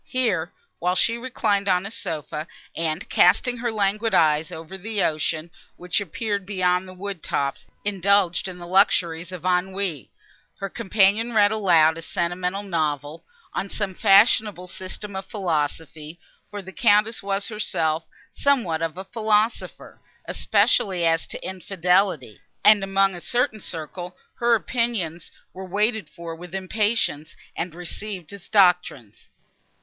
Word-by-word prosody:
Here, 195 -10 0 0.3
while 180 +1 +1
she 230 +5 +2
reclined 215 -5 0
on 180 0 +2
a 200 - -6
sofa, 155 -5 -5 0.3
and, 165 +1 -2
casting 245 +7 +4
her 240 0 -2
languid 210 +1 0
eyes 155 0 +3
over 160 +3 -8
the 205 +1 -2
ocean, 155 +1 -1 0.2
which 180 +3 -1
appeared 205 +2 -3
beyond 185 -1 0
the 185 - -10
wood 195 -2 -6
tops, 140 -1 -2 0.2
indulged 195 -2 +2
in 185 -1 -7
the 175 - -9
luxuries 175 -2 +2
of 180 -1 -8
ennui, 180 - -1 0.5
her 195 - -3
companion 210 +4 +2
read 205 -1 +5
aloud 165 -7 +4
a - - -7
sentimental 180 +4 -2
novel, 155 -4 -2 0.3
on 200 - -3
some 200 -2 -3
fashionable 200 -1 +4
system 190 +2 -8
of 190 0 -5
philosophy, 160 -3 -3 0.3
for 205 -1 -7
the 190 - -10
Countess 215 0 +3
was 195 +1 -2
herself 160 -7 -1 0.2
somewhat 230 - +1
of 165 +1 -2
a 190 - -6
philosopher, 220 +1 -1 0.3
especially 185 -4 +2
as 165 0 +2
to - - -7
infidelity, 180 - 0 0.2
and 210 -2 +7
among 195 0 +2
a 175 - -8
certain 240 -1 0
circle 175 +2 -6 0.2
her 235 0 +4
opinions 220 -9 -2 0.2
were 190 - -8
waited 210 +4 -1
for 170 -1 -8
with 175 +2 -9
impatience, 195 -5 -1 0.2
and 165 -1 -4
received 180 0 -7
as 200 -2 -12
doctrines. 180 - +2
185 Hz, 140 wpm, -24 LUFS, 170-205 Hz, 0.5 s, and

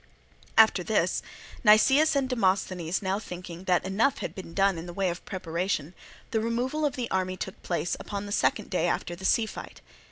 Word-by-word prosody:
After - - +6
this, - - +1 0.4
Nicias 270 +8 +6
and 275 -2 +1
Demosthenes 190 -7 0
now 190 +1 0
thinking 180 -3 -8
that 180 -1 +2
enough 215 +9 +1
had - - -5
been 180 -3 -9
done 195 -3 +2
in 165 - -8
the 175 - -7
way 190 -2 +1
of 170 - -8
preparation, 180 -3 -2 0.4
the 225 - +1
removal 250 +7 -1
of 285 -1 0
the 245 -3 -4
army 185 0 -1
took 190 - -6
place 175 0 -1
upon 205 -1 -5
the 205 - -7
second - - 0
day - - +1
after 175 - -2
the 190 +2 -8
sea 225 +3 +3
fight. - - -9
190 Hz, 190 wpm, -27 LUFS, 180-230 Hz, 0.4 s, After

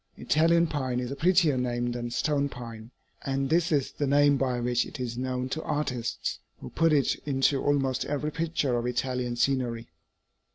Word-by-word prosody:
Italian 165 +2 +3
pine 130 -6 -2
is 125 +1 -4
a - - -3
prettier 165 -3 +3
name 120 -1 -1
than 120 0 -4
stone 140 +3 0
pine, 115 -3 -9 0.3
and 135 +1 -1
this 170 0 +2
is 140 -2 +1
the 145 - -2
name 145 +1 +4
by 130 -2 0
which 120 0 +1
it - - -9
is 120 -2 -3
known 125 0 -2
to 160 +4 -3
artists, 125 -7 -2 0.2
who - - -9
put 165 0 +2
it 145 -3 +3
into 135 0 +2
almost 135 -2 +1
every 150 +1 -2
picture 155 -5 -1
of 120 - -3
Italian 125 0 -1
scenery. 120 -4 0
135 Hz, 175 wpm, -27 LUFS, 125-145 Hz, 0.3 s, name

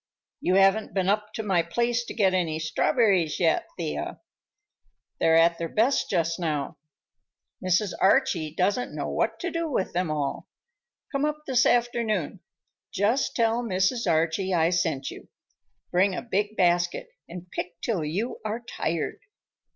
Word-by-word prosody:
"You 180 - +1
haven't 195 +3 +3
been 190 -1 +1
up 210 +1 0
to 220 - -3
my 190 -5 +2
place 235 +8 0
to - - -8
get 195 -4 +3
any 170 -4 0
strawberries 180 - +1
yet, 165 -3 +2
Thea. 160 -3 -4 1.0
They're 160 0 +4
at 170 +1 +4
their 165 -1 -3
best 235 - +1
just 170 -2 0
now. 155 -5 -2 0.8
Mrs. 185 +2 +1
Archie 190 - +3
doesn't 200 +8 0
know - - -3
what - - -1
to 350 -1 -2
do 335 -1 -2
with 195 -9 -1
them 180 -1 0
all. 145 -2 -2 0.6
Come 275 0 -1
up 300 0 -1
this 260 -3 +3
afternoon. 230 -7 0 0.5
Just 220 +8 +1
tell 230 0 +2
Mrs. 195 +1 0
Archie 165 +4 +1
I 165 0 +3
sent 165 -6 -1
you. - - -11 0.6
Bring 185 +2 +3
a - - -4
big 210 -2 -1
basket 175 -1 +1 0.2
and 175 +1 -9
pick 170 -1 -5
till 195 -5 -1
you 190 +11 -3
are 220 +2 -3
tired." 165 -8 -3
190 Hz, 150 wpm, -26 LUFS, 170-230 Hz, 1.0 s, They're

